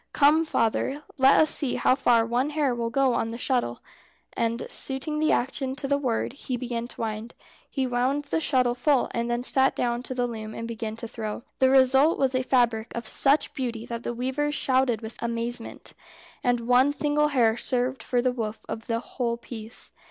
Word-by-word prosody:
"Come, 305 Hz, +3 st, +4 dB
father, 270 Hz, +2 st, 0 dB, 0.2 s
let 265 Hz, +1 st, +6 dB
us 310 Hz, -, +5 dB
see 280 Hz, -5 st, 0 dB
how -, -, +3 dB
far 240 Hz, -4 st, +3 dB
one 245 Hz, +5 st, 0 dB
hair 295 Hz, -4 st, 0 dB
will 235 Hz, -1 st, -2 dB
go 265 Hz, +1 st, +2 dB
on 225 Hz, -, 0 dB
the 230 Hz, +1 st, -5 dB
shuttle." 245 Hz, -, -1 dB, 0.5 s
And 230 Hz, 0 st, -1 dB
suiting 280 Hz, +3 st, -1 dB
the 310 Hz, -, +2 dB
action 265 Hz, +1 st, -1 dB
to 275 Hz, 0 st, -4 dB
the 280 Hz, 0 st, +1 dB
word, 245 Hz, -3 st, -1 dB
he 260 Hz, -2 st, -4 dB
began 235 Hz, -1 st, -4 dB
to -, -, -10 dB
wind. 220 Hz, +1 st, -4 dB, 0.3 s
He 270 Hz, -2 st, -1 dB
wound 255 Hz, +3 st, 0 dB
the 305 Hz, -, -1 dB
shuttle 255 Hz, -5 st, +2 dB
full, 255 Hz, +1 st, +1 dB
and 235 Hz, 0 st, -2 dB
then 240 Hz, +1 st, -1 dB
sat 265 Hz, +1 st, +4 dB
down 240 Hz, 0 st, -1 dB
to 255 Hz, +1 st, -6 dB
the 245 Hz, -1 st, +1 dB
loom 220 Hz, -2 st, -6 dB
and 230 Hz, -, -5 dB
began 225 Hz, -1 st, -5 dB
to 230 Hz, +1 st, -7 dB
throw. 220 Hz, 0 st, -5 dB, 0.2 s
The 260 Hz, -, +5 dB
result 265 Hz, +4 st, +5 dB
was 270 Hz, -1 st, +1 dB
a 255 Hz, -, +1 dB
fabric 240 Hz, -4 st, +1 dB
of 235 Hz, -1 st, -5 dB
such 285 Hz, +4 st, +2 dB
beauty 235 Hz, -4 st, -4 dB
that 235 Hz, -1 st, -5 dB
the 240 Hz, -, -4 dB
Weavers 265 Hz, +4 st, -1 dB
shouted 255 Hz, -5 st, +1 dB
with 220 Hz, +1 st, -9 dB
amazement, 235 Hz, 0 st, -1 dB, 0.5 s
and 245 Hz, -1 st, +1 dB
one 250 Hz, +4 st, +3 dB
single 295 Hz, 0 st, +1 dB
hair 240 Hz, -6 st, +3 dB
served 250 Hz, +2 st, -1 dB
for 245 Hz, -1 st, 0 dB
the 255 Hz, -, +2 dB
woof 220 Hz, -3 st, -5 dB
of 225 Hz, -, -6 dB
the 230 Hz, 0 st, -1 dB
whole 235 Hz, -2 st, -3 dB
piece. 230 Hz, -1 st, -7 dB
245 Hz, 200 wpm, -26 LUFS, 230-270 Hz, 0.5 s, let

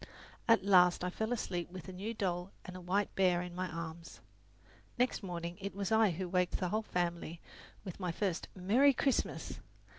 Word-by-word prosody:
At 230 Hz, -4 st, +5 dB
last 180 Hz, -3 st, +6 dB
I 180 Hz, -, -1 dB
fell 220 Hz, +4 st, -2 dB
asleep 180 Hz, -8 st, -2 dB
with 185 Hz, -1 st, -8 dB
a 185 Hz, -, -7 dB
new 205 Hz, +5 st, -4 dB
doll 180 Hz, -2 st, -1 dB, 0.2 s
and 185 Hz, -, -8 dB
a 185 Hz, -, -7 dB
white 195 Hz, +4 st, 0 dB
bear 180 Hz, -2 st, +3 dB
in 180 Hz, -1 st, -7 dB
my 185 Hz, +1 st, -2 dB
arms. 165 Hz, 0 st, -7 dB, 0.8 s
Next 250 Hz, 0 st, +1 dB
morning 175 Hz, -2 st, -5 dB
it 200 Hz, 0 st, -4 dB
was 200 Hz, +1 st, -2 dB
I 220 Hz, -1 st, +5 dB
who 180 Hz, +2 st, -3 dB
waked 180 Hz, 0 st, +1 dB
the 180 Hz, -, -1 dB
whole 215 Hz, +4 st, +1 dB
family 175 Hz, -4 st, -2 dB, 0.4 s
with 185 Hz, -3 st, -7 dB
my 180 Hz, -2 st, -1 dB
first 185 Hz, 0 st, -1 dB
"Merry 230 Hz, +10 st, +5 dB
Christmas!" 270 Hz, 0 st, 0 dB
185 Hz, 185 wpm, -34 LUFS, 175-200 Hz, 0.8 s, last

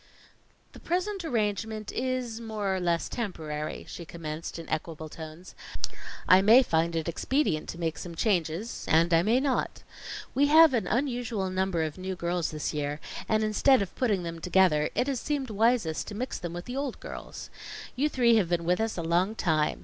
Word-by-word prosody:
"The -, -, -13 dB
present 370 Hz, +2 st, -1 dB
arrangement 215 Hz, -, -1 dB
is 250 Hz, -3 st, -2 dB
more 210 Hz, -4 st, -2 dB
or -, -, -1 dB
less 170 Hz, -2 st, 0 dB
temporary," 155 Hz, -9 st, -4 dB
she 170 Hz, -, -7 dB
commenced 160 Hz, -1 st, -6 dB
in 165 Hz, -, -8 dB
equable 155 Hz, 0 st, -4 dB
tones. 160 Hz, +3 st, -10 dB, 0.7 s
"I 185 Hz, +1 st, +8 dB
may 225 Hz, +6 st, +7 dB
find 165 Hz, -4 st, +1 dB
it 160 Hz, 0 st, -1 dB
expedient 170 Hz, -, 0 dB
to -, -, -5 dB
make 165 Hz, -2 st, -2 dB
some 170 Hz, -2 st, -7 dB
changes, 180 Hz, +2 st, -1 dB
and 165 Hz, +2 st, +4 dB
I 165 Hz, -, +6 dB
may 225 Hz, +7 st, +3 dB
not. 265 Hz, -2 st, -1 dB, 0.5 s
We 285 Hz, +2 st, +4 dB
have 315 Hz, 0 st, +7 dB
an 220 Hz, -7 st, 0 dB
unusual 240 Hz, -6 st, -1 dB
number 185 Hz, -3 st, 0 dB
of 155 Hz, +2 st, -4 dB
new 190 Hz, 0 st, -3 dB
girls 175 Hz, -1 st, -1 dB
this 155 Hz, 0 st, -3 dB
year; 145 Hz, 0 st, -2 dB, 0.3 s
and 220 Hz, 0 st, +2 dB
instead 215 Hz, +3 st, +4 dB
of 190 Hz, -, -8 dB
putting 210 Hz, -8 st, 0 dB
them 165 Hz, -1 st, -5 dB
together, 175 Hz, -4 st, +3 dB
it 250 Hz, -, +2 dB
has 270 Hz, -3 st, -1 dB
seemed 275 Hz, -4 st, -2 dB
wisest 215 Hz, -6 st, +1 dB
to 205 Hz, -, -6 dB
mix 255 Hz, +5 st, -3 dB
them 175 Hz, -2 st, -5 dB
with 175 Hz, +1 st, -6 dB
the 245 Hz, -, -6 dB
old 275 Hz, -2 st, -3 dB
girls. -, -, -8 dB, 0.4 s
You 285 Hz, +4 st, +1 dB
three 235 Hz, -5 st, +4 dB
have 190 Hz, -6 st, +2 dB
been 170 Hz, -1 st, 0 dB
with 180 Hz, +5 st, +2 dB
us 225 Hz, -2 st, -1 dB
a 170 Hz, -, -2 dB
long 175 Hz, +6 st, +1 dB
time. 155 Hz, -7 st, +1 dB
190 Hz, 190 wpm, -28 LUFS, 165-240 Hz, 0.7 s, I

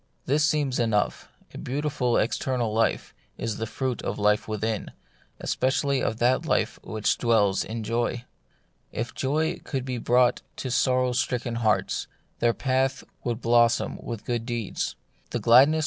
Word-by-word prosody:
This 150 Hz, +3 st, +2 dB
seems 145 Hz, -3 st, +1 dB
enough: 110 Hz, -3 st, 0 dB, 0.2 s
a -, -, -7 dB
beautiful 135 Hz, -2 st, 0 dB
external 120 Hz, 0 st, 0 dB
life 115 Hz, +1 st, 0 dB, 0.2 s
is 115 Hz, -2 st, -3 dB
the 115 Hz, -, -3 dB
fruit 125 Hz, +2 st, -2 dB
of -, -, -3 dB
life 105 Hz, 0 st, +2 dB
within, 110 Hz, 0 st, -2 dB, 0.5 s
especially 135 Hz, +1 st, +1 dB
of 110 Hz, -, -1 dB
that 125 Hz, +2 st, +2 dB
life -, -, 0 dB
which 110 Hz, -1 st, -1 dB
dwells 105 Hz, -5 st, +3 dB
in 115 Hz, 0 st, -5 dB
joy. 120 Hz, +2 st, -1 dB, 0.7 s
If 120 Hz, +4 st, -4 dB
joy 155 Hz, +5 st, 0 dB
could 130 Hz, -2 st, -3 dB
be 125 Hz, -2 st, -3 dB
brought 125 Hz, +1 st, +3 dB
to 130 Hz, -, -4 dB
sorrow 125 Hz, 0 st, +2 dB
stricken 125 Hz, -1 st, -1 dB
hearts, 110 Hz, -5 st, 0 dB, 0.3 s
their 120 Hz, -, +4 dB
path 130 Hz, 0 st, 0 dB, 0.2 s
would 120 Hz, -1 st, -2 dB
blossom 120 Hz, 0 st, +3 dB
with 115 Hz, -3 st, -6 dB
good 120 Hz, -2 st, -1 dB
deeds; 120 Hz, -5 st, -2 dB, 0.3 s
the -, -, -2 dB
gladness 125 Hz, +5 st, +7 dB
within 160 Hz, -, +1 dB
LtfC. -, -, +1 dB
120 Hz, 155 wpm, -26 LUFS, 115-130 Hz, 0.7 s, gladness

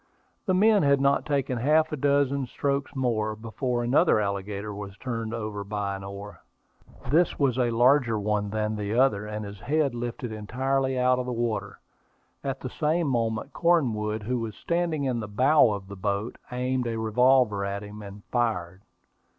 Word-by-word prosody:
The 185 Hz, -, +3 dB
men 210 Hz, +1 st, +5 dB
had 140 Hz, -2 st, +4 dB
not 140 Hz, +2 st, +2 dB
taken 135 Hz, -4 st, 0 dB
half 155 Hz, +5 st, +3 dB
a -, -, -1 dB
dozen 140 Hz, -1 st, +1 dB
strokes 140 Hz, +3 st, -2 dB
more, 110 Hz, -5 st, 0 dB
before 120 Hz, +2 st, -2 dB
another 130 Hz, +2 st, +4 dB
alligator 100 Hz, +1 st, -3 dB
was 100 Hz, -1 st, -8 dB
turned 115 Hz, -3 st, -4 dB
over 105 Hz, -3 st, -4 dB
by 100 Hz, -1 st, -3 dB
an 95 Hz, -, -8 dB
oar. 100 Hz, -1 st, -8 dB, 0.7 s
This 170 Hz, +3 st, +3 dB
was 130 Hz, -3 st, +1 dB
a 120 Hz, -1 st, +2 dB
larger 120 Hz, 0 st, +3 dB
one 105 Hz, 0 st, -1 dB
than 110 Hz, +1 st, -1 dB
the 105 Hz, +1 st, -2 dB
other, 110 Hz, -5 st, +2 dB
and 105 Hz, 0 st, -5 dB
his 100 Hz, -1 st, -9 dB
head 145 Hz, 0 st, 0 dB
was 120 Hz, -, -5 dB
lifted 120 Hz, 0 st, -4 dB
entirely 130 Hz, +5 st, -1 dB
out 125 Hz, 0 st, +3 dB
of 125 Hz, -, -3 dB
the -, -, -2 dB
water. 120 Hz, -2 st, -2 dB, 0.7 s
At 135 Hz, -1 st, -3 dB
the 130 Hz, -, -4 dB
same 160 Hz, +2 st, 0 dB
moment 115 Hz, -3 st, -1 dB
Cornwood, 110 Hz, -11 st, +1 dB
who 125 Hz, +3 st, -1 dB
was 110 Hz, -3 st, -5 dB
standing 170 Hz, -, -1 dB
in 130 Hz, -3 st, 0 dB
the 110 Hz, -, -5 dB
bow 130 Hz, +7 st, +4 dB
of 100 Hz, -2 st, -5 dB
the 100 Hz, -, -8 dB
boat, 100 Hz, +3 st, -3 dB
aimed 125 Hz, 0 st, -1 dB
a 115 Hz, -1 st, -2 dB
revolver 110 Hz, -1 st, +3 dB
at 100 Hz, +1 st, -3 dB
him, 105 Hz, +1 st, -9 dB
and 100 Hz, 0 st, -10 dB
fired. 95 Hz, -7 st, -1 dB
120 Hz, 180 wpm, -26 LUFS, 105-135 Hz, 0.7 s, men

